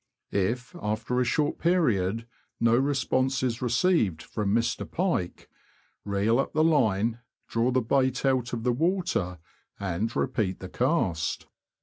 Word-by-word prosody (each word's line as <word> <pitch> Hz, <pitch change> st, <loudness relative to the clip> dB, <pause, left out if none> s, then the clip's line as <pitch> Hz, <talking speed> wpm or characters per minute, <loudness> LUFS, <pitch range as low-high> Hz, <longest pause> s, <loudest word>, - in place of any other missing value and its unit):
If, 120 Hz, -, -1 dB
after 110 Hz, +4 st, -1 dB
a -, -, +3 dB
short 145 Hz, +4 st, 0 dB
period, 115 Hz, -, +1 dB, 0.3 s
no 115 Hz, 0 st, +4 dB
response 135 Hz, 0 st, +1 dB
is 120 Hz, -2 st, -1 dB
received 125 Hz, -, +2 dB
from 105 Hz, -2 st, -2 dB
Mr. 115 Hz, +2 st, 0 dB
Pike, 170 Hz, -, -2 dB, 0.6 s
reel 105 Hz, +4 st, +1 dB
up 135 Hz, -, -1 dB
the 155 Hz, -, +3 dB
line, 115 Hz, -8 st, +2 dB, 0.3 s
draw 115 Hz, +2 st, +1 dB
the 130 Hz, 0 st, +2 dB
bait 130 Hz, +2 st, +1 dB
out 130 Hz, -2 st, +1 dB
of 115 Hz, -2 st, -3 dB
the 125 Hz, 0 st, +2 dB
water, 155 Hz, -, 0 dB, 0.4 s
and 100 Hz, +4 st, -2 dB
repeat 105 Hz, -8 st, -1 dB
the 95 Hz, -, -8 dB
cast. 100 Hz, -, 0 dB
120 Hz, 135 wpm, -27 LUFS, 105-135 Hz, 0.6 s, no